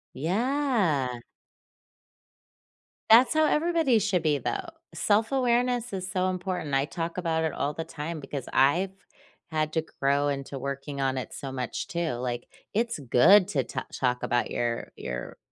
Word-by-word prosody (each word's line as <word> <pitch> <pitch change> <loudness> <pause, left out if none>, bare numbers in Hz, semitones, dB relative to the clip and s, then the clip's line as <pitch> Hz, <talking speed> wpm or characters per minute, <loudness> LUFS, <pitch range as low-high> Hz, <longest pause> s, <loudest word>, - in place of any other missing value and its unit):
Yeah. 190 - +1 1.9
That's 235 +3 +7
how 315 0 +4
everybody 315 -6 +3
should 180 -4 0
be, 150 -2 +2
though. 390 - -2 0.3
Self-awareness 240 +1 +1
is 185 -1 -4
so 185 -1 0
important. 180 -5 -3
I 135 +1 +3
talk 165 +2 -4
about 165 -2 0
it 160 - -1
all 145 +1 -1
the 165 - -4
time 160 0 -5
because 135 -2 -6
I've 155 +9 +3 0.6
had 155 -1 -1
to 160 0 0 0.2
grow 140 +1 +2
into 140 0 -4
working 140 +1 -5
on 135 -1 0
it 130 - -5
so 135 -2 -6
much, 130 -1 -4
too, 170 -2 -1
like, 120 0 -4 0.3
it's 230 -3 0
good 160 - +6
to 140 -9 +1
ta - - -5
talk 125 -1 0
about 120 0 +1
your 120 -1 -2
your - - -6
160 Hz, 150 wpm, -27 LUFS, 135-210 Hz, 1.9 s, That's